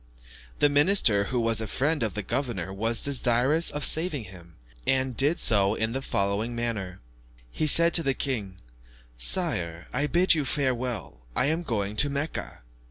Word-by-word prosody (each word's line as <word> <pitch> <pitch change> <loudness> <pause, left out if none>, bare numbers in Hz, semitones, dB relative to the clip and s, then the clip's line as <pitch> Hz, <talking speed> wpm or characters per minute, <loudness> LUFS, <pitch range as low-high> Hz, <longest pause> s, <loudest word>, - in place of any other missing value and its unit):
The - - +4
minister, 145 - +3
who 125 +4 -2
was 115 -1 +1
a 110 - -4
friend 145 +7 -1
of 110 -5 -2
the 105 - -4
governor, 95 -7 -3
was 115 +4 +1
desirous 135 +3 +2
of 145 0 -3
saving 160 -5 +1
him, 90 -4 -14 0.3
and 130 -1 +1
did 145 +7 +2
so 100 -2 +3
in 110 0 -2
the 135 +3 -4
following 100 +1 -2
manner. 110 -6 -4 0.5
He 155 - -1
said 170 +2 +3
to 170 - +6
the 135 -4 0
king, 110 -9 -3 0.6
"Sire, 80 +8 0
I 140 +4 0
bid 175 +4 +3
you 155 -3 0
farewell, 130 - -2 0.2
I - - +1
am 165 - -3
going 105 - -3
to 145 - +4
Mecca." 140 - -5
120 Hz, 165 wpm, -26 LUFS, 100-145 Hz, 0.6 s, to